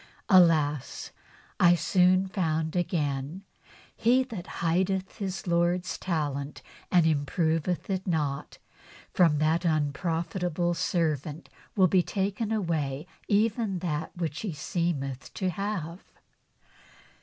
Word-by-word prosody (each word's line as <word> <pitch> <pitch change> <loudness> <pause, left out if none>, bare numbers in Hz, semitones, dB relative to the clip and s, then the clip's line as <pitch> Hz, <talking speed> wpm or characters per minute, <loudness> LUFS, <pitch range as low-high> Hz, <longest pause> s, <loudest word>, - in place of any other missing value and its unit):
^ - - -21 0.3
Alas! 160 - +3 0.5
I 175 0 +6
soon 185 +2 +3
found 160 -4 -1
again: 155 -1 -1 0.3
' - - -25
He 250 +3 +3
that 220 -9 -7 0.2
hideth 190 +3 0
his 190 -2 -4
Lord's 175 +1 +1
talent, 145 -5 -3 0.3
and 175 -3 +5
improveth 160 +3 0
it 190 0 -2
not, 150 -5 -2 0.6
from 165 -4 +4
that 160 +3 +2
unprofitable 170 +2 0
servant 155 -3 -1 0.3
shall 190 - +6
be 185 +1 +4
taken 200 +4 -2
away 160 -8 -1 0.2
even 215 -1 +1
that 160 -2 -3
which 165 -3 -3
he 205 -6 -3
seemeth 145 -6 -3
to 185 -1 -1
have.' 185 -2 -4
170 Hz, 110 wpm, -28 LUFS, 155-185 Hz, 0.6 s, I